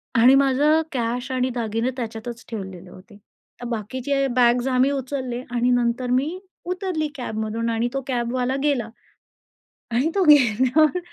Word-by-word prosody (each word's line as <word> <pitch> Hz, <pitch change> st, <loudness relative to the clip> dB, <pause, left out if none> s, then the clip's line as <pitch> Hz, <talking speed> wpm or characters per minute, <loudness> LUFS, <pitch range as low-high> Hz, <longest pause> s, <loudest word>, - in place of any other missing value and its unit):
आणि 245 Hz, +3 st, +6 dB
माझं 275 Hz, +3 st, +3 dB
कॅश 245 Hz, 0 st, -2 dB
आणि 255 Hz, 0 st, 0 dB
दागिने 225 Hz, +1 st, -1 dB
त्याच्यातच 235 Hz, 0 st, -6 dB
ठेवलेले 190 Hz, -5 st, -7 dB
होते. 200 Hz, +3 st, -15 dB, 0.4 s
तर -, -, -5 dB
बाकीचे 255 Hz, +5 st, -2 dB
बॅग्स 245 Hz, 0 st, +3 dB
आम्ही 260 Hz, +1 st, +2 dB
उचलले 260 Hz, -2 st, -3 dB
आणि 245 Hz, 0 st, +1 dB
नंतर 245 Hz, 0 st, 0 dB
मी 285 Hz, +8 st, 0 dB, 0.3 s
उतरली 360 Hz, -3 st, -2 dB
कॅबमधून 225 Hz, -2 st, -3 dB
आणि 230 Hz, +1 st, 0 dB
तो 270 Hz, -, -2 dB
कॅबवाला 250 Hz, 0 st, -1 dB
गेला. 265 Hz, -6 st, 0 dB, 1.0 s
आणि 250 Hz, +7 st, +1 dB
तो 390 Hz, -, +3 dB
गेल्यावर 290 Hz, -, +4 dB
250 Hz, 135 wpm, -23 LUFS, 230-275 Hz, 1.0 s, आणि